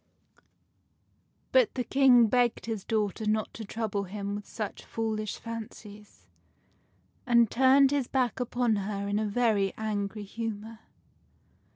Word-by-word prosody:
But -, -, +3 dB
the 250 Hz, -, -1 dB
King 255 Hz, -2 st, +5 dB
begged 240 Hz, +1 st, +1 dB
his 220 Hz, -4 st, -4 dB
daughter 215 Hz, -1 st, -1 dB
not 215 Hz, 0 st, 0 dB
to 225 Hz, -, -7 dB
trouble 210 Hz, -2 st, -3 dB
him 200 Hz, +1 st, -5 dB
with 205 Hz, 0 st, -6 dB
such 215 Hz, -2 st, -6 dB
foolish 215 Hz, -2 st, -3 dB
fancies, 215 Hz, -2 st, -9 dB, 1.0 s
and 235 Hz, -2 st, +4 dB
turned 265 Hz, +2 st, +5 dB
his 280 Hz, -4 st, 0 dB
back 255 Hz, -2 st, 0 dB
upon 245 Hz, -2 st, 0 dB
her 200 Hz, 0 st, -3 dB
in 205 Hz, +1 st, 0 dB
a 215 Hz, -, -1 dB
very 205 Hz, -3 st, +1 dB
angry 210 Hz, -1 st, -3 dB
humor. 220 Hz, +1 st, -6 dB
220 Hz, 130 wpm, -28 LUFS, 205-240 Hz, 1.0 s, King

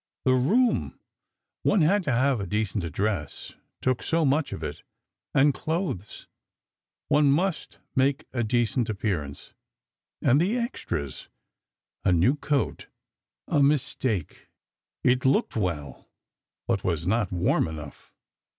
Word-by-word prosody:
The 130 Hz, -, +5 dB
room—one 205 Hz, -, 0 dB
had 195 Hz, +7 st, +4 dB
to 140 Hz, -, +1 dB
have 130 Hz, +1 st, +2 dB
a 100 Hz, -, -4 dB
decent 105 Hz, -1 st, -1 dB
address—took 100 Hz, -, -3 dB
so 165 Hz, -1 st, +1 dB
much 145 Hz, +2 st, +1 dB
of -, -, -6 dB
it... -, -, -5 dB, 0.5 s
and 140 Hz, +1 st, +4 dB
clothes—one 150 Hz, -, -3 dB
must 175 Hz, +4 st, -1 dB, 0.2 s
make 135 Hz, +1 st, +2 dB
a 120 Hz, -2 st, 0 dB
decent 120 Hz, +1 st, +1 dB
appearance—and 100 Hz, -, -3 dB
the 205 Hz, +8 st, +1 dB
extras! 85 Hz, -, -4 dB, 0.7 s
A 95 Hz, -, +3 dB
new 90 Hz, -, +4 dB
coat... 145 Hz, -1 st, -1 dB, 0.6 s
a 145 Hz, -, +2 dB
mistake... 130 Hz, -, 0 dB, 0.6 s
it 125 Hz, +1 st, +3 dB
looked 135 Hz, +1 st, +2 dB
well, 85 Hz, -9 st, -3 dB, 0.6 s
but -, -, 0 dB
was 85 Hz, -2 st, -1 dB
not 105 Hz, +1 st, +1 dB
warm 90 Hz, -2 st, +1 dB
enough. 75 Hz, -3 st, -9 dB
125 Hz, 110 wpm, -26 LUFS, 95-145 Hz, 0.7 s, The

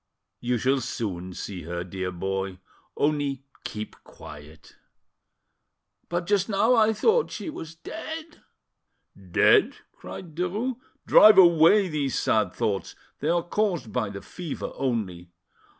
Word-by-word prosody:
You 125 Hz, 0 st, 0 dB
shall 130 Hz, +4 st, +1 dB
soon 95 Hz, -6 st, -4 dB
see 95 Hz, -3 st, -6 dB
her, 85 Hz, +2 st, -4 dB
dear 95 Hz, +1 st, -4 dB
boy; 95 Hz, +1 st, -3 dB, 0.4 s
only 145 Hz, -2 st, 0 dB, 0.2 s
keep 105 Hz, 0 st, -6 dB
quiet." 75 Hz, +1 st, -13 dB, 1.3 s
"But 175 Hz, 0 st, -2 dB
just 200 Hz, +1 st, +1 dB
now 220 Hz, +4 st, +3 dB
I 220 Hz, -2 st, +4 dB
thought 450 Hz, -, +2 dB
she 320 Hz, -, -6 dB
was 165 Hz, -, -8 dB
dead." 320 Hz, -, -8 dB, 0.9 s
"Dead!" -, -, +4 dB, 0.2 s
cried 170 Hz, -4 st, -10 dB
Derues. 205 Hz, +9 st, -2 dB, 0.3 s
"Drive 215 Hz, 0 st, +8 dB
away 175 Hz, +2 st, +6 dB
these 145 Hz, -5 st, -2 dB
sad 105 Hz, -4 st, +1 dB
thoughts. 100 Hz, 0 st, -2 dB, 0.2 s
They 150 Hz, -, -1 dB
are 170 Hz, 0 st, +2 dB
caused 175 Hz, -, -1 dB
by 110 Hz, -, -1 dB
the 100 Hz, 0 st, -8 dB
fever 170 Hz, -5 st, -6 dB
only." 100 Hz, -10 st, -3 dB
145 Hz, 125 wpm, -26 LUFS, -, 1.3 s, Drive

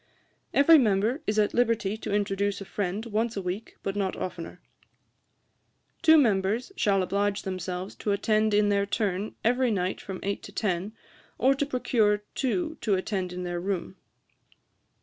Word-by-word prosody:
'Every 310 Hz, +3 st, +7 dB
member 220 Hz, +4 st, +1 dB
is 210 Hz, -, 0 dB
at 210 Hz, -1 st, +2 dB
liberty 230 Hz, -4 st, +1 dB
to 220 Hz, -, -6 dB
introduce 200 Hz, 0 st, 0 dB
a 195 Hz, -, -7 dB
friend 200 Hz, +3 st, -3 dB
once 225 Hz, 0 st, -1 dB
a -, -, -1 dB
week, 185 Hz, +5 st, -5 dB
but 195 Hz, -, -2 dB
not 195 Hz, -2 st, -1 dB
oftener. 180 Hz, -1 st, -6 dB, 1.4 s
'Two 320 Hz, -1 st, +7 dB
members 220 Hz, -, +2 dB
shall 195 Hz, -, +2 dB
oblige 200 Hz, +2 st, 0 dB
themselves 185 Hz, 0 st, -4 dB
to 210 Hz, -, -2 dB
attend 215 Hz, +1 st, +2 dB
in 205 Hz, 0 st, +3 dB
their 200 Hz, 0 st, +1 dB
turn 200 Hz, -1 st, -2 dB
every 250 Hz, +2 st, +2 dB
night 185 Hz, -3 st, -1 dB
from 190 Hz, -2 st, -6 dB
eight 200 Hz, 0 st, -2 dB
to -, -, -10 dB
ten, 195 Hz, -1 st, -2 dB, 0.4 s
or 265 Hz, +3 st, +4 dB
to 275 Hz, +1 st, -2 dB
procure 220 Hz, -6 st, +1 dB
two 315 Hz, +4 st, -1 dB
to 210 Hz, -4 st, +2 dB
attend 185 Hz, -1 st, -2 dB
in 180 Hz, 0 st, -5 dB
their 175 Hz, -1 st, -3 dB
room. 185 Hz, 0 st, -3 dB
205 Hz, 160 wpm, -27 LUFS, 190-225 Hz, 1.4 s, Every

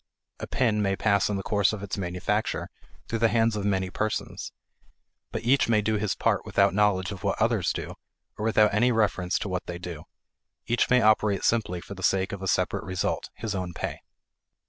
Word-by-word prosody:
A -, -, -5 dB
pin 110 Hz, -5 st, +1 dB
may 100 Hz, -1 st, +1 dB
pass 100 Hz, 0 st, +2 dB
in 105 Hz, -, -1 dB
the 95 Hz, -, -4 dB
course 100 Hz, +1 st, +2 dB
of 105 Hz, -2 st, -5 dB
its 100 Hz, -, -3 dB
manufacture 95 Hz, +3 st, -2 dB, 0.4 s
through 115 Hz, -, -2 dB
the 115 Hz, -, +4 dB
hands 115 Hz, -1 st, +2 dB
of 100 Hz, -1 st, -2 dB
many 95 Hz, -2 st, 0 dB
persons. 110 Hz, +3 st, -3 dB, 0.8 s
But -, -, -4 dB
each 125 Hz, +1 st, +3 dB
may 110 Hz, -2 st, +3 dB
do 110 Hz, +1 st, +1 dB
his 105 Hz, -1 st, -1 dB
part -, -, +1 dB
without -, -, +2 dB
knowledge 100 Hz, -1 st, +2 dB
of 95 Hz, -3 st, -8 dB
what -, -, 0 dB
others -, -, +2 dB
do -, -, -5 dB, 0.4 s
or -, -, -6 dB
without 110 Hz, -2 st, +4 dB
any 120 Hz, +4 st, +3 dB
reference 100 Hz, -5 st, +1 dB
to -, -, -4 dB
what 90 Hz, -1 st, -3 dB
they 85 Hz, -, -4 dB
do; 85 Hz, -3 st, -8 dB, 0.6 s
each 120 Hz, +1 st, +1 dB
may 125 Hz, -2 st, +4 dB
operate 105 Hz, -2 st, +3 dB
simply 100 Hz, -7 st, +1 dB
for 100 Hz, -, -9 dB
the 95 Hz, -, -10 dB
sake 95 Hz, +1 st, +1 dB
of 100 Hz, -, -6 dB
a 95 Hz, -, -3 dB
separate -, -, 0 dB
result 95 Hz, -1 st, -2 dB
his 110 Hz, -2 st, -4 dB
own 90 Hz, -2 st, -3 dB
pay. -, -, -4 dB
100 Hz, 205 wpm, -26 LUFS, 95-110 Hz, 0.8 s, the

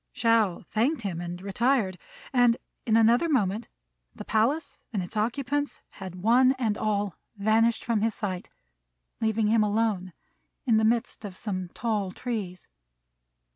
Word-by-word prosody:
Shao 225 Hz, -6 st, +2 dB
thanked 235 Hz, +5 st, 0 dB
him 175 Hz, -4 st, -3 dB
and 175 Hz, 0 st, -5 dB
retired; 200 Hz, -2 st, +1 dB, 0.3 s
and 245 Hz, -2 st, +4 dB, 0.3 s
in 220 Hz, 0 st, +4 dB
another 235 Hz, +8 st, +4 dB
moment 215 Hz, -5 st, +1 dB, 0.5 s
the -, -, -8 dB
palace 280 Hz, +8 st, 0 dB
and 200 Hz, -5 st, -1 dB
its 175 Hz, -, -9 dB
occupants 275 Hz, +6 st, -1 dB
had 190 Hz, -3 st, -8 dB
one 255 Hz, +4 st, +5 dB
and 235 Hz, -6 st, -1 dB
all 205 Hz, -3 st, -1 dB, 0.2 s
vanished 220 Hz, +3 st, +2 dB
from 225 Hz, -3 st, +1 dB
his 225 Hz, 0 st, +1 dB
sight, 185 Hz, -4 st, -4 dB, 0.7 s
leaving 220 Hz, 0 st, +1 dB
him 220 Hz, +1 st, +4 dB
alone 205 Hz, -4 st, 0 dB, 0.5 s
in 230 Hz, -4 st, +4 dB
the 220 Hz, -, +3 dB
midst 230 Hz, +1 st, +1 dB
of 195 Hz, -3 st, -7 dB
some 185 Hz, -5 st, -3 dB
tall 210 Hz, -5 st, -1 dB
trees. 200 Hz, -6 st, -5 dB
220 Hz, 140 wpm, -27 LUFS, 200-235 Hz, 0.7 s, one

